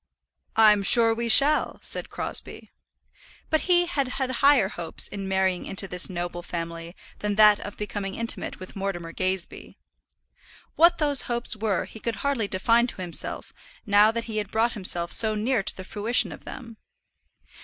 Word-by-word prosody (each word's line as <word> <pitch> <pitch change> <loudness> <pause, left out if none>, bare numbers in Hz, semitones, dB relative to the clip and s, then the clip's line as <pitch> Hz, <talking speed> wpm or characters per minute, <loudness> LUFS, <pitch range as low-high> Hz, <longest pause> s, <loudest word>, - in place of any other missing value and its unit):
"I'm 215 -2 +5
sure 225 +3 +5
we 235 +1 -4
shall," 285 +7 +5
said - - +1
Crosbie. - - -6 0.8
But 315 +4 0
he 350 -1 +4
had 285 -6 -2
had 260 0 -3
higher 260 -5 +3
hopes 170 -4 -2
in 195 -1 -7
marrying 190 -1 -1
into 195 0 -4
this 180 +1 +2
noble 175 -1 -5
family 170 0 -7 0.2
than 210 -1 -2
that 210 -1 +6
of 205 - -9
becoming 205 -2 -5
intimate 230 0 -4
with 185 - -11
Mortimer 190 -4 -5
Gazebee. 185 0 -3 1.0
What 340 +1 +4
those 290 -5 +2
hopes 240 -1 -1
were 215 -3 -2
he 220 - -13
could 230 +1 -4
hardly 265 -7 0
define 230 +6 +1
to 215 - -7
himself 175 -2 -4 0.3
now 205 +1 +5
that 230 +1 -3
he 220 -2 -6
had 205 -2 -3
brought 225 +2 0
himself 175 -4 -1
so 215 -1 +4
near 225 +2 0
to - - -4
the 185 - -7
fruition 215 +5 0
of - - -12
them. 230 -3 -10
210 Hz, 165 wpm, -24 LUFS, 190-235 Hz, 1.0 s, that